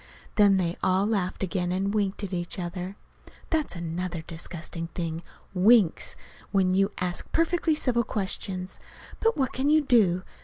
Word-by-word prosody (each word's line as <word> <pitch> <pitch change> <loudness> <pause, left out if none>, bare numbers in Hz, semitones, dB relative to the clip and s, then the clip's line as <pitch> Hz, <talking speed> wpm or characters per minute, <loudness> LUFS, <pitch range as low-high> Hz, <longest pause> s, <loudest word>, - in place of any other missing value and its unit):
Then 205 -2 +5
they 175 -2 0
all 185 +2 +2
laughed 200 -4 -1
again, 180 -2 -1
and 195 +2 0
winked 205 -1 0
at 195 - -4
each 175 +1 -3
other. 180 +1 -4 0.6
(That's 310 - 0
another 170 0 -4
disgusting 165 0 -6
thing 165 -2 -3 0.3
winks 195 -1 +4 0.3
when 190 -2 +2
you 195 +1 +3
ask 180 -1 -2
a - - -29
perfectly 330 -1 +2
civil 245 -5 +1
question! 190 -3 -2 0.5
But 455 -4 +2
what 265 -3 0
can 270 +3 +1
you 310 +1 +5
do? 205 -10 +3
190 Hz, 155 wpm, -27 LUFS, 175-220 Hz, 0.6 s, Then